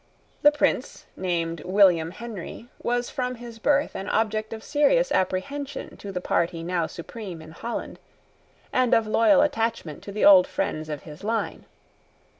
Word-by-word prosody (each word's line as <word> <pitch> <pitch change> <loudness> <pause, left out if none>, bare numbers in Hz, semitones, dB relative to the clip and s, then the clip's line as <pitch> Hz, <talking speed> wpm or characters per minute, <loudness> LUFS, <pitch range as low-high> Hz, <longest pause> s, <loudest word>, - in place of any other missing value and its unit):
This 295 0 +6
Prince, - - 0
named 170 -3 -2
William 180 -4 +4
Henry, 225 +2 -8
was 245 0 -1
from 250 -2 -2
his 235 -1 -10
birth 285 +4 +2
an 195 - -4
object 220 0 0
of 220 -1 -7
serious 400 - +2
apprehension 270 +10 -2
to 200 - -7
the 180 - -3
party 170 -1 0
now 170 -1 -1
supreme 185 0 -8
in 160 0 -11
Holland, 230 +8 -5 0.7
and 255 -1 +4
of 225 - +2
loyal 230 +7 +4
attachment 230 - -2
to 200 - -8
the 210 - +1
old 190 -3 +8
friends 155 0 -3
of 150 -2 -5
his 155 +3 -11
line. 225 +2 -2
215 Hz, 155 wpm, -25 LUFS, 175-240 Hz, 0.7 s, old